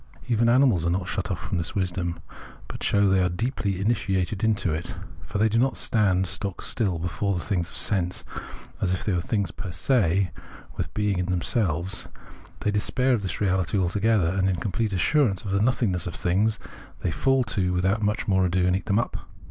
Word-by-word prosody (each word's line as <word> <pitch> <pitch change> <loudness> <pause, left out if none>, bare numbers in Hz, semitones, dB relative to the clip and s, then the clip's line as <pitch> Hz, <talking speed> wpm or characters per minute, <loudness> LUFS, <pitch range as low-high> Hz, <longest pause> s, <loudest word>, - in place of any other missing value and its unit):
Even 115 -1 +3
animals 120 - +4
are 85 - +1
not 90 +1 -1
shut 95 0 -2
off 95 - -1
from 90 +1 -3
this 85 - -3
wisdom; 90 -3 -1 0.5
but - - -8
show 100 0 +3
they 95 -1 +3
are 90 - +2
deeply 100 0 -2
initiated 100 -2 0
into 105 -6 +1
it. 85 +2 -4 0.3
For - - -4
they 110 +2 +4
do 110 +1 +1
not 130 +2 +1
stand 95 -4 +2
stock 100 0 +1
still 100 -7 0
before 90 +3 -1
things 90 -2 -1
of - - -12
sense 90 -4 0 0.6
as 90 -1 +1
if 90 - -3
these 105 - +1
were 90 - +1
things 100 -1 -1
fer 95 - -6
se, 95 -2 +2 0.4
with - - -3
being 105 -3 0
in 90 - -1
themselves: 90 0 0 0.5
they 105 - +1
despair 125 +5 +1
of 115 - +1
this 95 -4 -4
reality 95 -1 +1
altogether, 100 0 +2
and 95 +1 +1
in 95 - +1
complete 105 +4 -2
assurance 100 - +2
of 100 - -3
the 100 +1 +2
nothingness 110 -7 +1
of 85 - -5
things 105 +5 +1 0.4
they - - 0
fall 135 - +2
to 95 -6 -1
with 90 0 0
out 100 +3 +2 0.3
more 95 -2 +3
ado 90 0 +1
and 90 0 +3
eat 100 - -4
them 100 -1 +2
up. 115 - -2
95 Hz, 200 wpm, -25 LUFS, 90-110 Hz, 0.6 s, animals